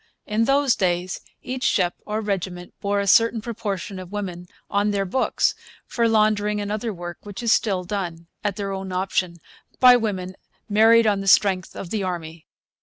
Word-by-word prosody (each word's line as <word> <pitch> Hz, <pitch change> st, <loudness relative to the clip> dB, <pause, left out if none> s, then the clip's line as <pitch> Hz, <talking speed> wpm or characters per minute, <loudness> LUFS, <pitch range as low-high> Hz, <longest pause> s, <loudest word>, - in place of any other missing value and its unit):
In 215 Hz, +2 st, +1 dB
those 275 Hz, -1 st, +3 dB
days 180 Hz, -1 st, -1 dB, 0.2 s
each 255 Hz, 0 st, -4 dB
ship 180 Hz, -6 st, +2 dB
or 215 Hz, +1 st, -2 dB
regiment 185 Hz, -4 st, -4 dB
bore 200 Hz, 0 st, 0 dB
a 200 Hz, -, 0 dB
certain 230 Hz, +4 st, +4 dB
proportion 205 Hz, -4 st, -4 dB
of 185 Hz, 0 st, -9 dB
women 180 Hz, -4 st, -5 dB, 0.2 s
on 205 Hz, +1 st, +1 dB
their 200 Hz, -1 st, 0 dB
books 255 Hz, +8 st, +1 dB, 0.3 s
for 235 Hz, -1 st, +1 dB
laundering 210 Hz, -1 st, +2 dB
and 205 Hz, 0 st, -3 dB
other 215 Hz, +2 st, -2 dB
work 175 Hz, -2 st, -7 dB
which 205 Hz, +2 st, -8 dB
is 230 Hz, -, +4 dB
still 195 Hz, -5 st, +1 dB
done, 175 Hz, -3 st, -4 dB, 0.2 s
at 205 Hz, -2 st, -1 dB
their 200 Hz, -1 st, -3 dB
own 190 Hz, -1 st, -5 dB
option, 185 Hz, -1 st, -1 dB, 0.4 s
by 250 Hz, -1 st, +8 dB
women 190 Hz, -5 st, -3 dB, 0.3 s
'married 225 Hz, +2 st, +5 dB
on 205 Hz, -2 st, +2 dB
the 195 Hz, -, -6 dB
strength' 190 Hz, -1 st, +3 dB
of 180 Hz, -, -7 dB
the 215 Hz, -, -1 dB
Army. 170 Hz, -3 st, -5 dB
200 Hz, 180 wpm, -23 LUFS, 185-215 Hz, 0.4 s, by